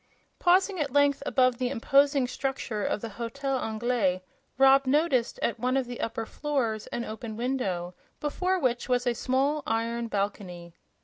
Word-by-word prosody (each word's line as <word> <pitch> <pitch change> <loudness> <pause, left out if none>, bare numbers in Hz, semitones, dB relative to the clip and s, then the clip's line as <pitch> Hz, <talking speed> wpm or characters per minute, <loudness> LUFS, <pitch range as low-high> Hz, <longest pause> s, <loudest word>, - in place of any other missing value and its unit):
Pausing 370 +1 +3
at 285 -3 -1
length 285 0 +3
above 255 -2 +2
the 250 -1 0
imposing 275 +2 +3
structure 250 -4 -3
of - - -1
the 230 - -5
Hotel 265 +6 -3
Anglais, 220 -5 0 0.3
Rob 270 0 +6
noticed 275 -4 +2
at 235 - 0
one 255 +3 +1
of 265 - 0
the 245 0 -7
upper 225 0 -3
floors 245 -6 -2
an 240 - -4
open 220 0 -7
window, 200 -9 -2 0.3
before 365 +5 0
which 255 -6 -1
was 245 -1 +1
a 245 - +2
small 270 +5 0
iron 230 +1 -1
balcony. 190 -5 -4
250 Hz, 160 wpm, -27 LUFS, 225-275 Hz, 0.3 s, Rob